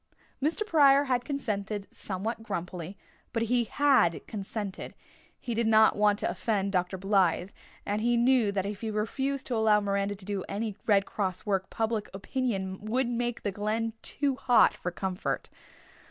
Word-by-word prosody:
Mr. 320 +9 0
Pryor 285 -7 +5
had 250 -3 0
consented 210 -7 -3
somewhat 210 +4 -4
grumpily, 180 -3 -5 0.4
but 230 -1 +1
he 240 +1 +2
had 265 - +3
consented 200 -1 -5 0.4
he 240 - -4
did 230 0 +1
not 220 0 +6
want 205 0 +3
to - - -1
offend 200 -3 -1
Dr. 185 0 0
Blythe, 190 -1 +2 0.3
and 205 +1 -1
he 240 +1 +2
knew 240 -3 +4
that 195 -1 -1
if 200 0 -5
he 225 - -2
refused 265 +6 -2
to 245 - -2
allow 220 -1 +4
Miranda 200 0 -1
to 190 -1 -12
do 200 -2 -3
any 210 0 -3
Red 200 -2 +4
Cross 190 -2 -3
work 195 -2 0
public 225 -1 -2
opinion 195 -3 -3
would 240 +4 0
make 240 0 -2
the 205 - -1
Glen 215 +3 -1
too 280 -2 -1
hot 245 -2 +5
for 180 - -4
comfort. 185 +1 -3
210 Hz, 165 wpm, -29 LUFS, 195-240 Hz, 0.4 s, not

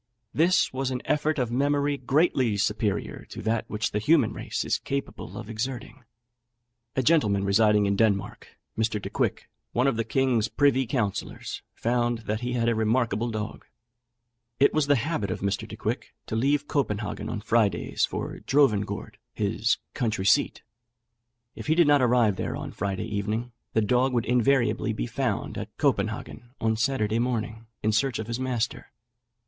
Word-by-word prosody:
This 170 0 +3
was 130 0 -1
an 125 -1 -3
effort 150 +1 +1
of 125 -3 -1
memory 145 +2 +1
greatly 130 -4 +2
superior 105 0 -1
to - - -8
that 110 +1 0
which 105 +1 -1
the 105 - 0
human 150 +8 +3
race - - -3
is - - 0
capable 140 0 -5
of - - -7
exerting." 120 +2 -5 0.9
A 130 - +1
gentleman 110 -10 +3
residing 105 +1 +4
in 100 0 +1
Denmark, 100 -2 0 0.3
Mr. 110 -1 0
Decouick, - - -2 0.3
one 125 - +2
of 135 -5 +2
the 115 - +1
king's 120 -1 +1
privy 135 -3 +2
councillors, 110 -6 -3
found 120 0 0
that 105 +1 -1
he 125 0 -2
had 115 -1 +1
a 120 - +3
remarkable 115 0 +1
dog. 110 -1 -5 1.0
It 140 - +5
was 155 -2 +2
the 145 - +5
habit 125 - -1
of 90 - -3
Mr. 100 0 -1
Decouick - - -4
to - - -4
leave 140 +5 +1
Copenhagen 105 -8 -2
on - - -3
Fridays 110 -1 +1
for - - -2
Drovengourd, 125 -8 +1 0.2
his 110 +3 +1 0.2
country 110 -7 -1
seat. - - +3 0.9
If - - -8
he 155 - +3
did 170 0 +5
not 145 -1 +5
arrive 120 -5 +3
there - - -2
on - - -6
the - - -18
Friday 100 +2 -2
evening, 110 +3 -2 0.2
the 110 - +3
dog 125 +5 +2
would 120 -2 +1
invariably 125 +1 +2
be - - -2
found - - -2
at - - -8
Copenhagen 120 +2 -1
on 110 0 +1
Saturday 110 -2 0
morning, 115 -2 -2 0.2
in 110 - +2
search 130 +4 +1
of 110 - -4
his 115 +2 -4
master. 125 -3 -2
115 Hz, 165 wpm, -26 LUFS, 110-135 Hz, 1.0 s, It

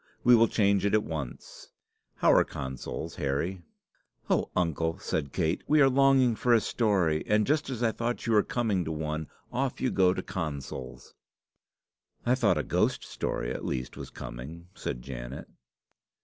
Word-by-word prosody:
We 125 0 +7
will 115 0 +5
change 100 -3 +2
it 100 +1 +3
at 105 - +3
once. 75 -7 -7 0.5
How - - +4
are - - +6
consols, 65 +5 -6
Harry?" 75 +7 -1 0.7
"Oh, - - +2
uncle!" 80 -2 0
said 70 -3 -3
Kate, 85 +2 0
"we 155 - +4
were 135 -2 +6
longing 135 -2 +4
for 120 +2 +3
a - - +5
story, 95 -10 +1
and 105 0 +3
just 150 0 +1
as 125 -2 -3
I 115 - +3
thought 120 +2 -3
you 115 - +1
were 105 - +6
coming 105 -5 0
to 80 - -4
one, 80 0 -3 0.3
off 130 +1 -1
you 130 - 0
go 95 -2 +4
to 95 - -3
consols!" 70 -7 -6 1.1
"I 120 - +4
thought 130 - +3
a - - 0
ghost - - +1
story - - -3
at - - -6
least 65 -1 -3
was - - -8
coming," 80 +9 -9
said - - -5
Janet. 60 -1 -7
90 Hz, 170 wpm, -28 LUFS, 75-115 Hz, 1.1 s, We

